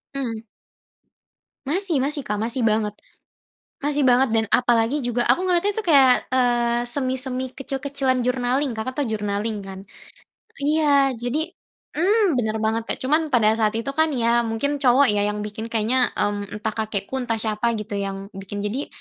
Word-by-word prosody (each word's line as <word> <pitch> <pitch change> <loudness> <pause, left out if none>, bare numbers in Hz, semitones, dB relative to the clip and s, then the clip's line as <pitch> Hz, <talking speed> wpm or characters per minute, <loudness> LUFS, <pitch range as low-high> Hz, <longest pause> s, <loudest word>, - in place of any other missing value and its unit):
Mhm. 230 -5 -4 1.2
Masih 345 +2 +1
masih, 290 0 -1
Kak. 210 0 -1
Masih 235 +4 0
banget 215 -2 +1 0.9
masih 290 -1 +1
banget. 255 0 +4
Dan 220 0 +1
apalagi 245 +3 +2
juga 240 0 0
aku 245 +9 +3
ngeliatnya 370 +2 +1
tuh 445 - -2
kayak, 265 -4 +5
eee, 240 -1 +1
semi-semi 260 0 -2
kecil-kecilan 270 -1 -2
journaling. 250 0 0
Kakak 255 +4 -3
tahu 245 - -2
journaling 210 0 -2
kan? 190 0 -8 0.8
Iya, 285 -1 +2
jadi 245 +5 -2 0.6
mmm, 395 - +3
bener 220 -2 -1
banget, 220 +1 0
Kak. - - -1
Cuman 310 +4 +2
pada 230 -6 +3
saat 215 0 +1
itu 230 +5 -2
kan 320 - +5
ya 235 0 +2
mungkin 280 +6 -1
cowok 265 +1 +5
ya 205 - 0
yang 210 0 -3
bikin 220 +2 -6
kayaknya. 225 +3 +1 0.2
Mmm, 205 0 -1
entah 220 +1 -2
kakekku, 215 +1 -3
entah 235 -2 -1
siapa 215 +2 -1
gitu 210 0 -8
yang 195 +1 -5
bikin. 200 +1 -7
Jadi 240 +8 -3
245 Hz, 160 wpm, -22 LUFS, 220-275 Hz, 1.2 s, kayak